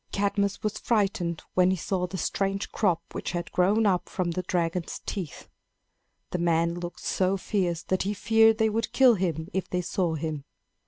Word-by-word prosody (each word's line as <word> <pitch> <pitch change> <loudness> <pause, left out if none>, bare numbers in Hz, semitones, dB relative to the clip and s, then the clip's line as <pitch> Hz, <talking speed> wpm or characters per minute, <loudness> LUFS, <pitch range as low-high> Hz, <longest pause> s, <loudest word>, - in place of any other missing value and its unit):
Cadmus 200 0 0
was 215 -1 -2
frightened 195 -7 0
when 180 0 +4
he 190 - +1
saw 180 +1 -1
the 190 - -6
strange 195 +3 -1
crop 175 -6 +1
which - - -4
had 175 -1 -3
grown 205 +5 +3
up 185 -3 +1
from 180 -2 -1
the 185 - -2
dragon's 175 -1 -2
teeth. 180 -7 -5 0.8
The 180 - -1
men 170 0 +2
looked 175 0 -6
so 190 +1 +1
fierce 180 -3 -1
that 185 - 0
he 205 +2 -1
feared 225 +1 +4
they 220 -1 +3
would 225 +1 -2
kill 260 -2 +6
him 165 -5 -1
if 190 - -2
they 180 - 0
saw 175 -1 -1
him. 155 -2 -4
185 Hz, 180 wpm, -27 LUFS, 170-200 Hz, 0.8 s, kill